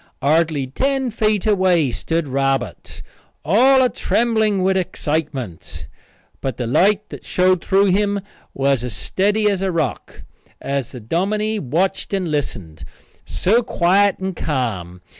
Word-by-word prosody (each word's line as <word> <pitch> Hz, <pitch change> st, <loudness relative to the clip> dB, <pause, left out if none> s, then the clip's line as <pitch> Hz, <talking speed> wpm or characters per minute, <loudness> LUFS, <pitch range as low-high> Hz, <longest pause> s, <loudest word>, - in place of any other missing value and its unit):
Hardly 155 Hz, 0 st, +1 dB
ten 265 Hz, -, -1 dB
feet 215 Hz, -3 st, 0 dB
away 185 Hz, -, +2 dB
stood 165 Hz, +5 st, -2 dB
Robert, 135 Hz, 0 st, -2 dB, 0.4 s
all 260 Hz, -, +5 dB
a -, -, +4 dB
trembling 220 Hz, -6 st, +1 dB
with 190 Hz, 0 st, +2 dB
excitement, 140 Hz, -, -3 dB, 0.6 s
but 130 Hz, -4 st, -3 dB
the 125 Hz, -, -3 dB
light 200 Hz, -, +2 dB
that -, -, -9 dB
showed 185 Hz, -1 st, +1 dB
through 195 Hz, +1 st, +3 dB
him 200 Hz, +1 st, +1 dB, 0.3 s
was 135 Hz, -2 st, +1 dB
as 125 Hz, -5 st, -4 dB
steady 205 Hz, -, 0 dB
as 200 Hz, -2 st, 0 dB
a 190 Hz, -1 st, 0 dB
rock, 160 Hz, -7 st, -3 dB, 0.4 s
as 140 Hz, -3 st, -3 dB
the 125 Hz, -, -8 dB
dominie 210 Hz, -, -1 dB
watched 185 Hz, +8 st, -1 dB
and 180 Hz, -4 st, -2 dB
listened, 100 Hz, -, -4 dB, 0.4 s
so 185 Hz, -, +2 dB
quiet 195 Hz, -1 st, +2 dB
and 190 Hz, -1 st, -4 dB
ca'm. 100 Hz, -, -3 dB
175 Hz, 135 wpm, -20 LUFS, 135-205 Hz, 0.6 s, all